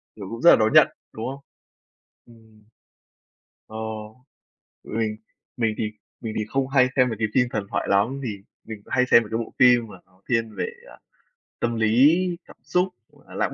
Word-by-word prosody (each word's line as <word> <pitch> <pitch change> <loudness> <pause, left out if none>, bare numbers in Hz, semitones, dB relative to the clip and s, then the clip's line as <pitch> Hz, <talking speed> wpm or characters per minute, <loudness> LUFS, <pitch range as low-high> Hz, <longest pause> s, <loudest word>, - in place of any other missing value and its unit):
Kiểu, 100 -3 -8
cũng 115 +1 -7
rất 170 - +7
là - - +9
đón 110 0 +1
nhận, - - +8 0.3
đúng 110 - -6
không? 135 +2 -6 0.9
Ừm. 110 -2 -20 1.0
Ờ, 110 - -9 1.1
mình 110 -1 -3 0.4
mình 115 -3 +1
thì 105 -1 -2 0.3
mình 110 -1 -5
thì 105 - -1
không 135 +4 -1
hay 130 -2 +4
xem 130 -1 +4
mấy 110 - -4
cái 110 - +1
phim 125 -2 +3
thần 105 -2 -3
thoại - - -2
lắm 105 +8 +1
vì 110 -6 -4 0.3
mình 110 -2 -8
hay 125 -1 +2
xem 115 - +7
mấy 105 - -11
cái 115 - 0
bộ 115 - -5
phim 120 -2 +5
mà 100 - -12
nó 90 0 -30
thiên 115 -3 0
về, - - -2 0.2
ờ, - - -14 0.6
tâm 120 0 -1
lý, 115 +8 +4 0.3
cảm - - -16
xúc, 180 +1 +1 0.2
hoặc - - -23
là - - -11
lãng - - -1
115 Hz, 195 wpm, -24 LUFS, 110-125 Hz, 1.1 s, là